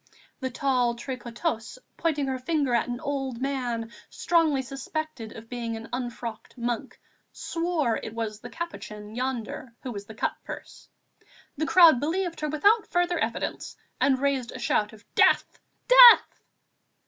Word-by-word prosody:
The 260 - -2
tall 250 -2 +1
tricoteuse, 240 - -4 0.2
pointing 300 -4 0
her 265 -1 -2
finger 280 -1 0
at 235 - +2
an 245 0 -4
old 270 -4 -3
man, 245 -4 -2 0.2
strongly 320 -6 +2
suspected 270 -3 -5
of 225 0 -10
being 230 -2 -4
an 225 +1 -10
unfrocked 240 -2 -5
monk, 235 -1 -3 0.3
swore 330 -8 -1
it 220 - -7
was 220 -2 -4
the - - -9
"Capuchin" 215 -11 -7
yonder 245 -1 -4
who 255 - -4
was 200 -2 -7
the 220 - -10
cut - - -1
purse. - - -10 0.7
The 310 +2 -2
crowd 330 -6 +7
believed 335 +4 -2
her 305 - -2
without 405 +9 +3
further 350 0 +1
evidence - - -3 0.2
and 270 -1 +3
raised 270 -2 -1
a - - -6
shout 210 -3 0
of 220 -1 -16
"Death! - - +3 0.3
death!" - - +8
260 Hz, 150 wpm, -26 LUFS, 230-310 Hz, 0.7 s, death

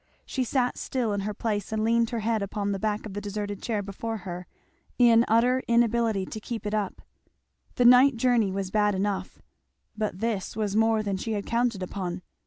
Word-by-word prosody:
She 260 - -2
sat 250 0 0
still 240 -5 -1
in 200 - -1
her 205 +2 -3
place 205 -2 -2
and 220 0 0
leaned 230 0 +2
her 235 -2 -3
head 220 0 0
upon 200 0 -2
the 195 - -2
back 215 +1 -1
of 210 - -7
the 205 - -4
deserted 205 -1 -4
chair 215 -3 -2
before 220 +3 -4
her, 180 -1 -6 0.5
in 235 -2 +6
utter 245 +4 +3
inability 235 -4 +2
to 215 - -7
keep 225 0 -6
it 210 - -2
up. 210 -3 -2 0.7
The 245 - +2
night 250 +2 +7
journey 230 -4 +2
was 190 -1 -3
bad 210 -1 +2
enough, 200 +1 -3 0.5
but 215 -4 -2
this 215 -4 -2
was 210 -2 -1
more 225 0 +3
than 200 -2 -1
she 220 +4 -3
had 205 -1 -3
counted 235 -4 0
upon. 180 -1 -4
215 Hz, 195 wpm, -27 LUFS, 200-230 Hz, 0.7 s, night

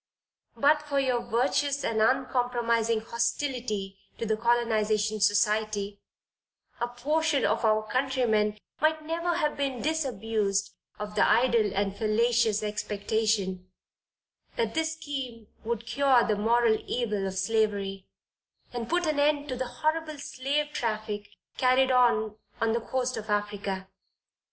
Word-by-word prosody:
But 295 +2 +4
for 290 -2 -1
your 255 -3 +1
virtuous 270 +4 0
and 220 -1 0
uncompromising 235 -2 +1
hostility 235 -4 -2 0.2
to 230 - -3
the 220 0 +1
Colonization 220 -2 +1
Society, 205 0 +1 0.8
a 240 - 0
portion 290 +4 0
of - - +1
our 215 -1 +3
countrymen 240 -6 +1 0.2
might 310 0 +1
never 335 +2 -1
have 300 -1 0
been 275 -3 -2
disabused 225 -10 -1 0.2
of 210 0 -6
the 210 - +1
idle 235 -3 +3
and 195 0 0
fallacious 220 0 +2
expectation, 210 -2 -1 0.9
that 225 -1 -1
this 320 0 0
scheme 265 -8 -6
would 235 0 -3
cure 255 0 +3
the 215 - +1
moral 225 +1 +3
evil 210 -5 -1
of 190 0 -5
slavery, 195 -1 0 0.7
and 235 -1 -4
put 350 +1 +1
an 305 -2 0
end 290 0 +2
to 255 - -2
the 255 0 -3
horrible 310 +3 -2
slave 285 +2 -2
traffic 215 -2 -3 0.3
carried 260 +1 +4
on 220 -4 +3 0.2
on 225 0 +1
the 235 - 0
coast 255 +2 -2
of 215 0 -7
Africa. 205 -2 -2
235 Hz, 130 wpm, -28 LUFS, 215-265 Hz, 0.9 s, But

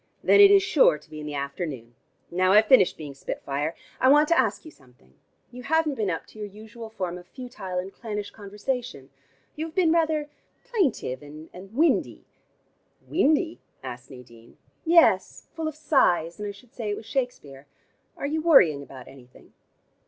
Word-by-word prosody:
"Then 410 - +6
it 400 - +9
is 400 -1 +6
sure - - +4
to - - -22
be 155 - -8
in 150 - -7
the 150 - -5
afternoon. 140 -4 -5 0.4
Now 185 +2 +2
I've 215 +1 +6
finished 215 -6 +5
being 150 -3 -8
spit 135 - -7
fire 145 +4 -3 0.2
I - - +3
want 295 +2 +6
to 335 - +4
ask - - 0
you 315 - -10
something. 125 - -24 0.4
You 250 0 -9
haven't 310 +2 +1
been 215 -6 -2
up 165 - -3
to 215 - -16
your 210 - -5
usual 220 +3 -11
form 185 -5 -5
of 175 - -16
futile 195 -8 -7
and 185 +2 -4
clannish 210 -3 -6
conversation. 205 - -5 0.4
You 315 +2 -4
have 315 - -14
been 350 -4 +3
rather 315 -3 +1 0.3
plaintive 370 - -1
and 150 +2 -12
windy 220 - -1 0.4
" - - -39
"Windy?" 320 0 +2 0.2
asked 125 -1 -8
Nadine. 120 -3 -15 0.3
"Yes, 320 - +3
full 320 -1 -4
of 310 - -5
sighs, 195 - +1
and 210 - -4
I - - -4
should 210 +4 -18
say 225 -4 -5
it 205 - -2
was - - -10
Shakespeare. 180 - -4 0.5
Are - - -4
you 310 +2 -1
worrying 180 - +5
about 130 -2 -12
anything?" 130 -2 -17
210 Hz, 180 wpm, -25 LUFS, -, 0.5 s, it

